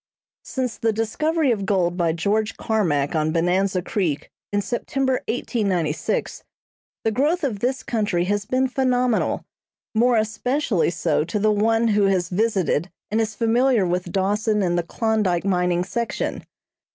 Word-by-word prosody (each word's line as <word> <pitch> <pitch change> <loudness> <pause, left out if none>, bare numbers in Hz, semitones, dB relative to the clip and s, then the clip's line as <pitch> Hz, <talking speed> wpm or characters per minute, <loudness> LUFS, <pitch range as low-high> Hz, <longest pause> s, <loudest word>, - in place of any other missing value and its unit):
Since 255 -3 -3
the 225 - +2
discovery 280 +7 0
of 210 -4 -1
gold 185 -3 +1
by 170 -2 +1
George 210 +6 0
Carmack 165 -11 0
on 155 -1 +1
Bonanza 180 +2 +1
Creek 180 -9 -2 0.2
in 205 - +1
September, 260 +4 -1
1896, 200 - -1 0.6
the 225 - +1
growth 300 +10 +1
of 235 -8 -1
this 255 +4 -1
country 210 -7 0
has 205 +2 -1
been 260 +1 +2
phenomenal, 250 -3 +1 0.5
more 235 +2 +3
especially 220 - 0
so 165 -3 0
to 195 - -2
the 215 +1 +3
one 225 +2 +2
who 205 -1 +3
has 180 -3 +1
visited 190 -4 0 0.2
and 220 +1 +2
is 215 -1 -2
familiar 235 -1 +3
with 180 0 -2
Dawson 210 +3 +1
and 175 -1 +1
the 175 - +2
Klondyke 200 -1 0
mining 180 -2 +1
section. 235 +5 -3
210 Hz, 145 wpm, -23 LUFS, 180-235 Hz, 0.6 s, more